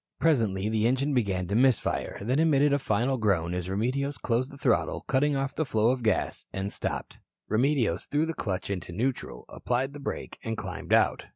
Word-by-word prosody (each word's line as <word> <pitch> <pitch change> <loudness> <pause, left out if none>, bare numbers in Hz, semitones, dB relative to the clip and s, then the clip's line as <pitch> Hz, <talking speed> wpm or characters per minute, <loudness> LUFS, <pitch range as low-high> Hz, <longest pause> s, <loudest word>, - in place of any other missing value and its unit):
Presently 110 -11 +2
the 110 0 +2
engine 135 +4 +1
began 95 -7 0
to 100 - -3
miss 125 0 +5
fire, - - -3
then 130 +7 +1
emitted 145 -3 +4
a 140 - +3
final 130 0 0
groan 90 -6 +1
as 90 0 -3
Remedios 130 +8 -1
closed 125 +2 0
the 140 - -12
throttle, - - +1
cutting 140 +2 +1
off 135 0 -1
the 160 - 0
flow 115 -4 +2
of 130 -1 -2
gas, 110 -2 0
and 95 +1 -3
stopped. - - -4 0.3
Remedios 120 - +1
threw 150 +2 +1
the 165 - -3
clutch 95 - -3
into 90 -3 -4
neutral, 110 - -3
applied 130 +3 -2
the 145 - -8
brake, 140 - -5
and 115 -1 -3
climbed - - -6
out. - - +3
120 Hz, 195 wpm, -28 LUFS, 100-140 Hz, 0.3 s, miss